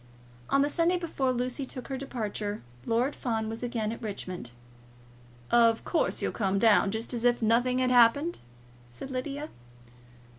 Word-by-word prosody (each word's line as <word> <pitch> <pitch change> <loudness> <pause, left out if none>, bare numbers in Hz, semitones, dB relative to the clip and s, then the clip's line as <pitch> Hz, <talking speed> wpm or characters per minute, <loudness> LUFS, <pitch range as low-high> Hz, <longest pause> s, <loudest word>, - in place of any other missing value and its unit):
On 275 - +4
the - - +2
Sunday 335 +4 +2
before 310 -7 -1
Lucy 250 +2 -2
took 255 -1 -7
her 270 - -2
departure, 215 -6 -4 0.2
Lord 245 +5 +1
Fawn 225 -3 -2
was 225 0 -6
again 235 -3 -2
at 230 - -7
Richmond. 185 - -6 1.0
"Of 230 -1 +4
course, 340 - 0
you'll - - 0
come 195 -3 0
down, 210 -1 +5
just 220 +4 -4
as 235 -1 -2
if 240 0 +3
nothing 245 +3 +3
had 255 0 +2
happened," 250 +8 +4 0.5
said 120 - -9
Lydia. 280 +4 -4
245 Hz, 155 wpm, -28 LUFS, 220-270 Hz, 1.0 s, down